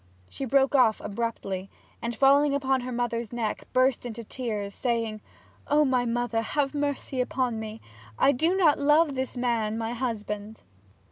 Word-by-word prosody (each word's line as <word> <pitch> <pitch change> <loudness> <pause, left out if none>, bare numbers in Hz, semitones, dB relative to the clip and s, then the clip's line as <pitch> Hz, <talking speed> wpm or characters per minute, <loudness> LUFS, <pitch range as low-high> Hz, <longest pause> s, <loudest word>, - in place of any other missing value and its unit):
She 270 - -5
broke 270 +2 +3
off 250 -6 +4
abruptly, 200 -3 -4 0.3
and 235 0 -3
falling 280 +3 +4
upon 265 -2 +1
her 250 +1 -5
mother's 235 -2 -2
neck, 230 -3 -3
burst 255 0 +2
into 235 -1 -6
tears, 210 -4 -4
saying, 230 -3 -2 0.5
'O 300 +1 +4
my 255 -2 +2
mother, 235 -1 0
have 275 +5 -1
mercy 285 -2 -2
upon 250 -2 -1
me 220 0 -7 0.4
I 280 - +5
do 325 +8 +1
not 325 -6 +4
love 295 +1 +4
this 260 -1 -3
man, 230 -3 0
my 225 +1 -2
husband!' 215 -3 -4
245 Hz, 155 wpm, -27 LUFS, 225-270 Hz, 0.5 s, I